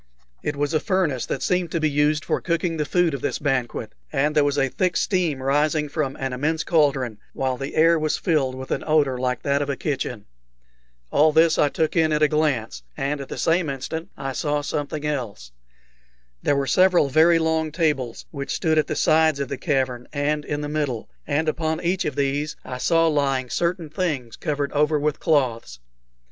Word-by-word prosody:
It 150 Hz, -, -2 dB
was 145 Hz, +1 st, -1 dB
a 155 Hz, -, +3 dB
furnace 180 Hz, -, 0 dB
that -, -, -3 dB
seemed 180 Hz, -2 st, 0 dB
to 165 Hz, -, +1 dB
be 155 Hz, -, +2 dB
used 150 Hz, +1 st, +1 dB
for -, -, -1 dB
cooking 170 Hz, -1 st, -1 dB
the 150 Hz, -, -1 dB
food 175 Hz, 0 st, +2 dB
of 140 Hz, -, -4 dB
this -, -, -1 dB
banquet, 135 Hz, -4 st, -2 dB, 0.2 s
and 150 Hz, +2 st, +1 dB
there 150 Hz, -, +5 dB
was 145 Hz, 0 st, 0 dB
a 135 Hz, -1 st, +3 dB
thick 180 Hz, +6 st, 0 dB
steam 170 Hz, -9 st, 0 dB
rising 150 Hz, +2 st, +1 dB
from 140 Hz, -3 st, -2 dB
an 135 Hz, -1 st, -3 dB
immense 155 Hz, +5 st, -1 dB
cauldron, 135 Hz, -, +1 dB
while 130 Hz, -1 st, -1 dB
the 135 Hz, +2 st, -6 dB
air 165 Hz, +1 st, +5 dB
was 155 Hz, 0 st, 0 dB
filled 145 Hz, -8 st, 0 dB
with 130 Hz, 0 st, -8 dB
an -, -, -1 dB
odor 145 Hz, -5 st, +2 dB
like 125 Hz, -1 st, -1 dB
that 140 Hz, 0 st, +1 dB
of 145 Hz, -, -2 dB
a 140 Hz, -, 0 dB
kitchen. 125 Hz, -6 st, -3 dB, 0.9 s
All 155 Hz, +2 st, +4 dB
this 160 Hz, +1 st, +4 dB
I 145 Hz, -, +4 dB
took 160 Hz, +3 st, -1 dB
in 160 Hz, -2 st, +3 dB
at 150 Hz, 0 st, +2 dB
a -, -, +6 dB
glance, 145 Hz, -, 0 dB, 0.2 s
and 140 Hz, +1 st, -2 dB
at 135 Hz, -, -8 dB
the -, -, -6 dB
same 165 Hz, -1 st, +1 dB
instant 160 Hz, +6 st, -5 dB
I 135 Hz, 0 st, -4 dB
saw 145 Hz, +3 st, -1 dB
something 145 Hz, +1 st, -3 dB
else. 115 Hz, -, -4 dB, 0.9 s
There 145 Hz, -, +2 dB
were 140 Hz, 0 st, 0 dB
several 180 Hz, +2 st, +4 dB
very 160 Hz, +5 st, +5 dB
long 160 Hz, -1 st, 0 dB
tables, 150 Hz, -8 st, -1 dB
which 140 Hz, -3 st, -4 dB
stood 160 Hz, -3 st, +2 dB
at 155 Hz, -, +1 dB
the 155 Hz, -, -2 dB
sides 155 Hz, -2 st, +3 dB
of 140 Hz, -, -3 dB
the -, -, -2 dB
cavern 130 Hz, -5 st, -1 dB
and 150 Hz, +1 st, -1 dB
in 145 Hz, 0 st, -3 dB
the 150 Hz, -, -3 dB
middle, 145 Hz, -, -3 dB, 0.2 s
and 155 Hz, +3 st, 0 dB
upon 160 Hz, 0 st, -1 dB
each 180 Hz, +2 st, 0 dB
of 145 Hz, -, -2 dB
these 145 Hz, +2 st, -1 dB
I 125 Hz, -1 st, -6 dB
saw 165 Hz, +4 st, +3 dB
lying 135 Hz, -5 st, 0 dB
certain 170 Hz, -1 st, -1 dB
things 150 Hz, -9 st, -2 dB
covered 145 Hz, -3 st, -2 dB
over 150 Hz, +1 st, +2 dB
with 150 Hz, 0 st, -1 dB
cloths. 120 Hz, -, 0 dB
150 Hz, 205 wpm, -23 LUFS, 135-160 Hz, 0.9 s, a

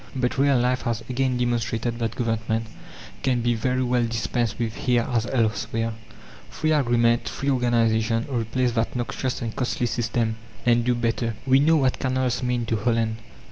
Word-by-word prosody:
But 125 Hz, 0 st, -1 dB
real 140 Hz, -1 st, +4 dB
life 125 Hz, +1 st, +1 dB
has 115 Hz, -2 st, -2 dB
again 130 Hz, 0 st, 0 dB
demonstrated 120 Hz, -1 st, -1 dB
that 115 Hz, -1 st, -2 dB
Government 115 Hz, -1 st, -1 dB, 0.6 s
can 125 Hz, -2 st, +1 dB
be 120 Hz, +1 st, +2 dB
very 125 Hz, +3 st, 0 dB
well 125 Hz, -1 st, +1 dB
dispensed 115 Hz, 0 st, -1 dB
with 115 Hz, -2 st, -2 dB
here 120 Hz, -2 st, +1 dB
as 120 Hz, -2 st, 0 dB
elsewhere. 115 Hz, -1 st, 0 dB, 0.6 s
Free 155 Hz, 0 st, -1 dB
agreement, 120 Hz, -5 st, +2 dB
free 140 Hz, +1 st, -1 dB
organization, 115 Hz, -2 st, +2 dB
replace 125 Hz, -1 st, 0 dB
that 115 Hz, +1 st, -1 dB
noxious 125 Hz, +1 st, -2 dB
and 115 Hz, -1 st, -4 dB
costly 125 Hz, -1 st, -1 dB
system, 115 Hz, -1 st, -1 dB, 0.3 s
and 120 Hz, -1 st, +4 dB
do 125 Hz, +1 st, +2 dB
better. 115 Hz, -1 st, -1 dB
We 135 Hz, 0 st, +5 dB
know 160 Hz, +3 st, +4 dB
what 130 Hz, -4 st, +2 dB
canals 130 Hz, -1 st, 0 dB
mean 125 Hz, -2 st, 0 dB
to 115 Hz, -1 st, 0 dB
Holland. 115 Hz, 0 st, 0 dB
120 Hz, 165 wpm, -24 LUFS, 115-125 Hz, 0.6 s, We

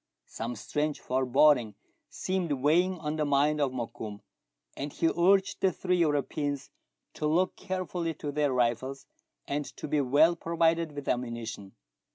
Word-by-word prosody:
Some 115 Hz, +2 st, -5 dB
strange 145 Hz, +6 st, -2 dB
foreboding 130 Hz, -3 st, +3 dB, 0.3 s
seemed 185 Hz, -4 st, -2 dB
weighing 165 Hz, +7 st, +2 dB
on 155 Hz, -1 st, -3 dB
the 155 Hz, -, +1 dB
mind 145 Hz, +1 st, +2 dB
of 140 Hz, -2 st, +1 dB
Mokoum, 115 Hz, -4 st, -6 dB, 0.5 s
and 145 Hz, +1 st, -4 dB
he 165 Hz, -, +1 dB
urged 190 Hz, +3 st, +2 dB
the 190 Hz, -, +4 dB
three 180 Hz, 0 st, 0 dB
Europeans 145 Hz, -3 st, -1 dB, 0.4 s
to 150 Hz, -, -2 dB
look 180 Hz, +4 st, +2 dB
carefully 180 Hz, -3 st, -3 dB
to 145 Hz, -1 st, -5 dB
their 145 Hz, -1 st, +1 dB
rifles 125 Hz, +2 st, 0 dB, 0.4 s
and 145 Hz, +1 st, -1 dB
to -, -, -5 dB
be 150 Hz, 0 st, +1 dB
well 145 Hz, +6 st, +4 dB
provided 165 Hz, -1 st, +1 dB
with 145 Hz, -1 st, -6 dB
ammu 125 Hz, -1 st, 0 dB
nition. 110 Hz, -4 st, -7 dB
145 Hz, 150 wpm, -29 LUFS, 130-165 Hz, 0.5 s, the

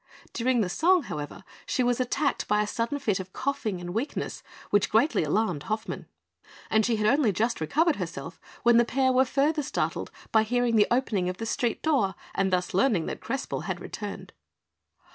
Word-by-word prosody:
During 245 Hz, 0 st, +1 dB
the 195 Hz, -, +1 dB
song, 345 Hz, -, +3 dB
however, 150 Hz, -, -6 dB, 0.2 s
she 255 Hz, -, +1 dB
was 245 Hz, 0 st, +1 dB
attacked 275 Hz, +3 st, 0 dB
by 210 Hz, 0 st, +3 dB
a -, -, -2 dB
sudden 230 Hz, +6 st, -2 dB
fit 215 Hz, -9 st, 0 dB
of 185 Hz, 0 st, -8 dB
coughing 260 Hz, -8 st, -2 dB
and 175 Hz, 0 st, -6 dB
weakness, 235 Hz, +8 st, -3 dB, 0.3 s
which 205 Hz, -1 st, +3 dB
greatly 225 Hz, -, +3 dB
alarmed 175 Hz, -1 st, 0 dB
Hoffmann; 215 Hz, +1 st, -3 dB, 0.6 s
and 220 Hz, 0 st, +4 dB
she 235 Hz, +1 st, +2 dB
had 215 Hz, -1 st, -1 dB
only 245 Hz, 0 st, +4 dB
just 225 Hz, +2 st, -1 dB
recovered 310 Hz, -, +2 dB
herself, 170 Hz, -4 st, -6 dB, 0.2 s
when 240 Hz, -1 st, +6 dB
the 235 Hz, -, +6 dB
pair 260 Hz, +2 st, +1 dB
were 260 Hz, +1 st, +4 dB
further 290 Hz, +4 st, +1 dB
startled 275 Hz, -, -2 dB, 0.2 s
by 220 Hz, -, +5 dB
hearing 240 Hz, +1 st, +1 dB
the 210 Hz, -1 st, +5 dB
opening 220 Hz, -7 st, +1 dB
of 180 Hz, -, -5 dB
the 225 Hz, -, -4 dB
street 230 Hz, 0 st, -1 dB
door 240 Hz, -, +2 dB, 0.2 s
and 195 Hz, -1 st, +1 dB
thus 180 Hz, -1 st, 0 dB
learning 195 Hz, -4 st, +2 dB
that -, -, -5 dB
Crespel -, -, -3 dB
had -, -, -2 dB
returned. -, -, -7 dB
225 Hz, 185 wpm, -27 LUFS, 195-260 Hz, 0.6 s, when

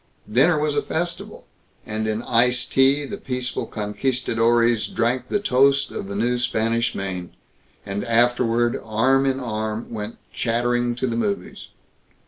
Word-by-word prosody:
Dinner 140 Hz, +9 st, +4 dB
was 150 Hz, -1 st, 0 dB
a 145 Hz, -, +2 dB
festival, 170 Hz, +3 st, -4 dB, 0.4 s
and 110 Hz, +1 st, -3 dB
in 110 Hz, +2 st, -2 dB
iced 120 Hz, +1 st, +2 dB
tea 135 Hz, +2 st, +4 dB
the -, -, -6 dB
peaceful 125 Hz, -1 st, -3 dB
conquistadores 115 Hz, +1 st, +1 dB
drank 125 Hz, +2 st, -1 dB
the 205 Hz, -, 0 dB
toast 140 Hz, -5 st, +3 dB
of 95 Hz, -, -5 dB
the 100 Hz, -, -5 dB
new 120 Hz, +4 st, 0 dB
Spanish 115 Hz, 0 st, 0 dB
Main; 90 Hz, -2 st, -5 dB, 0.5 s
and 100 Hz, 0 st, -3 dB
afterward, 120 Hz, 0 st, +2 dB
arm 130 Hz, +5 st, +2 dB
in 135 Hz, 0 st, 0 dB
arm, 110 Hz, -2 st, -4 dB
went 110 Hz, 0 st, -5 dB, 0.2 s
chattering 120 Hz, +1 st, 0 dB
to 125 Hz, -, -2 dB
the 120 Hz, -2 st, -1 dB
movies. 200 Hz, -, -3 dB
120 Hz, 140 wpm, -22 LUFS, 110-130 Hz, 0.5 s, Dinner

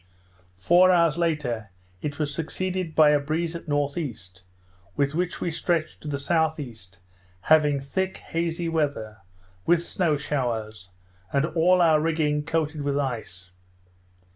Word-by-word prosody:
Four 175 Hz, -, +5 dB
hours 170 Hz, -2 st, +3 dB
after, 130 Hz, -10 st, -1 dB, 0.3 s
it 145 Hz, -1 st, -4 dB
was 145 Hz, -2 st, -2 dB
succeeded 180 Hz, +2 st, -3 dB
by 155 Hz, -2 st, +6 dB
a 145 Hz, -, +4 dB
breeze 160 Hz, +4 st, -2 dB
at 170 Hz, -1 st, -8 dB
N.E. 145 Hz, -2 st, -1 dB, 0.8 s
with 140 Hz, 0 st, +1 dB
which 175 Hz, +2 st, -2 dB
we 170 Hz, -, -2 dB
stretched 165 Hz, -1 st, -1 dB
to -, -, -9 dB
the 145 Hz, -1 st, -2 dB
S.E., 140 Hz, -, -2 dB, 0.4 s
having 150 Hz, +1 st, +4 dB
thick 190 Hz, +8 st, -2 dB
hazy 170 Hz, +1 st, -3 dB
weather, 145 Hz, -10 st, -2 dB, 0.5 s
with 170 Hz, 0 st, +4 dB
snow 170 Hz, -4 st, 0 dB
showers, 110 Hz, -9 st, -3 dB, 0.4 s
and 140 Hz, +2 st, +2 dB
all 175 Hz, +2 st, +3 dB
our 155 Hz, -2 st, +4 dB
rigging 155 Hz, -2 st, 0 dB
coated 155 Hz, -1 st, -1 dB
with 140 Hz, 0 st, -1 dB
ice. 110 Hz, -9 st, -4 dB
150 Hz, 135 wpm, -25 LUFS, 140-165 Hz, 0.8 s, by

